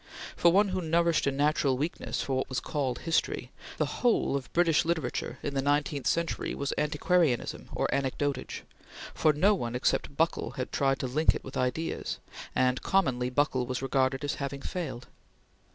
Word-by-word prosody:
For 170 - +5
one 200 +3 +4
who 185 0 -1
nourished 170 -1 +2
a - - +3
natural 145 -1 +2
weakness 155 +6 -2
for 135 - -1
what 130 - -2
was 130 - -1
called 135 -5 -2
history, 165 0 0 0.3
the - - +2 0.2
whole 240 - +3
of 135 -2 -4
British 170 -4 +3
literature 160 -7 -2
in 145 - -2
the 135 - +1
nineteenth 145 0 0
century 170 -1 0
was 140 - -2
antiquarianism 150 -2 +1
or - - 0
anecdotage, 140 0 -2 0.5
for 155 - +4
no 180 +8 +4
one 120 - -3
except 135 +2 0
Buckle 165 +1 0
had 130 - -3
tried 135 -1 +2
to - - -1
link 150 +6 +2
it - - -6
with 135 - -9
ideas, 130 +6 -2 0.4
and 130 0 +2
commonly 130 -10 +1
Buckle 130 -2 +1
was 130 +1 -3
regarded 135 0 +1
as 145 - 0
having 140 0 -4
failed. 135 -9 -4
140 Hz, 170 wpm, -29 LUFS, 130-165 Hz, 0.5 s, For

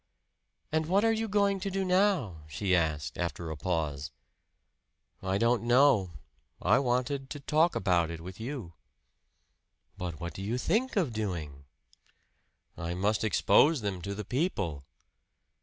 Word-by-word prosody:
"And 160 0 0
what 195 +5 +3
are 225 - +4
you 225 0 -1
going 200 -1 +2
to 195 +1 -3
do 195 0 -1
now?" 180 - +2
she 95 +6 0
asked 75 -6 -1
after 85 -1 -3
a - - -4
pause. 75 -4 -2 1.1
"I 95 0 0
don't 115 +1 +2
know. 120 -6 +4 0.5
I - - +4
wanted 130 +1 -1
to 145 - -6
talk 155 +4 +2
about 85 -4 +2
it 85 -1 -6
with 90 +4 -9
you." 115 - -6 1.3
"But 85 -4 -4
what 85 0 -5
do 95 - -7
you 110 +5 -2
think 235 - 0
of 165 - +1
doing?" 80 -10 -4 1.1
"I 85 +1 -4
must 105 +4 +1
expose 145 +6 +4
them 100 -4 -3
to 100 +2 -4
the 105 0 -5
people." 100 - -2
105 Hz, 145 wpm, -30 LUFS, -, 1.3 s, are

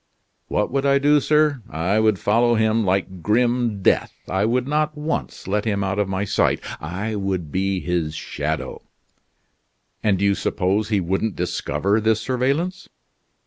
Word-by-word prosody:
"What - - -1
would 135 +1 0
I 140 0 +4
do, 145 +1 +4
sir! 150 -2 +2
I 90 +5 0
would 110 -2 +3
follow 115 +5 +2
him 110 0 +2
like 95 -1 -1
grim 120 0 +1
death; - - +2 0.2
I 95 +2 0
would 125 +3 0
not 150 +1 0
once 150 +2 -4
let 105 +2 0
him 100 -3 -1
out 95 +1 -1
of 100 -2 0
my 95 +1 -1
sight; 100 - +1 0.2
I 95 +8 -4
would 95 -6 -2
be 95 0 0
his 85 -4 -2
shadow." 75 +1 -4 1.2
"And 105 -3 +2
do 100 - 0
you 100 - +4
suppose 100 +2 0
he 105 -3 +2
wouldn't 95 +4 -1
discover 90 +3 0
this 110 0 +2
surveillance?" 140 - -1
105 Hz, 160 wpm, -22 LUFS, 95-125 Hz, 1.2 s, I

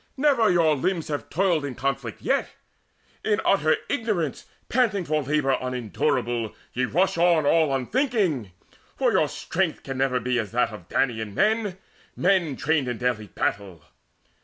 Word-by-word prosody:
Never 265 -6 +3
your 165 -4 +4
limbs 165 +3 -1
have 145 -1 -4
toiled 175 -2 +1
In 140 -3 -4
conflict 125 -4 -3
yet. - - +1 0.7
In 210 -1 +1
utter 155 -5 +3
ignorance 210 - -2 0.2
Panting 215 -7 +1
for 155 0 0
labour 140 -1 +1
unendurable, 120 -2 -1 0.2
Ye 125 +1 0
rush 170 +6 +1
on 170 -3 +4
all 160 0 +3
unthinking; 160 - 0 0.4
for - - +2
your - - +3
strength - - -2
Can 135 -1 -5
never 130 -1 +2
be 125 +1 0
as 110 -4 -4
that 120 -1 +2
of 90 -5 -11
Danaan 110 -5 -1
men, 215 -3 +1 0.4
Men 180 -6 +2
trained 150 -1 0
in 120 -2 -2
daily 120 -4 -1
battle. 95 -6 -3
145 Hz, 150 wpm, -25 LUFS, 125-185 Hz, 0.7 s, your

